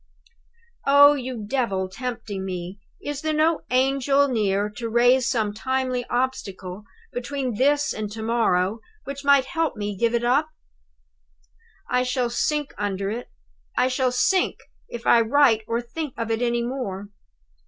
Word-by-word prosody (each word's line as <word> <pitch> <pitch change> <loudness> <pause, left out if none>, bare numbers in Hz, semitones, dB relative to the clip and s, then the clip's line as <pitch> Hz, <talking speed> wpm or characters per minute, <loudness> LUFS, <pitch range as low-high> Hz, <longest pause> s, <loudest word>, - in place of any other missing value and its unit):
"Oh, 285 +1 +8
you 255 -5 -5
Devil 205 -7 0
tempting 210 -2 -5
me, 185 +1 -5 0.2
is 290 -1 -4
there 310 -1 -1
no 315 +1 +2
Angel 275 +2 +3
near 205 -5 +1
to 230 +2 -5
raise 245 +2 +4
some 220 -5 0
timely 255 +2 -1
obstacle 205 -6 -3 0.3
between 255 0 -3
this 290 +3 +2
and 210 -1 -5
to 220 +1 -6
morrow 220 -3 +1 0.2
which 280 0 -7
might 280 -2 +5
help 325 0 -1
me 205 -1 -3
to 190 - -12
give 235 0 +2
it 235 - 0
up? 275 +6 +2 1.4
"I 250 0 +1
shall 250 -1 -1
sink 295 +3 -1
under 200 -1 -2
it 240 +3 -5 0.5
I 250 +1 +3
shall 255 0 +1
sink, 370 +9 +2 0.3
if 235 0 -7
I 235 - +6
write 235 -1 +4
or 230 +1 -1
think 265 +4 -6
of 230 -1 -2
it 225 +1 0
any 240 -1 +1
more! 215 -6 -4
245 Hz, 155 wpm, -24 LUFS, 215-270 Hz, 1.4 s, Oh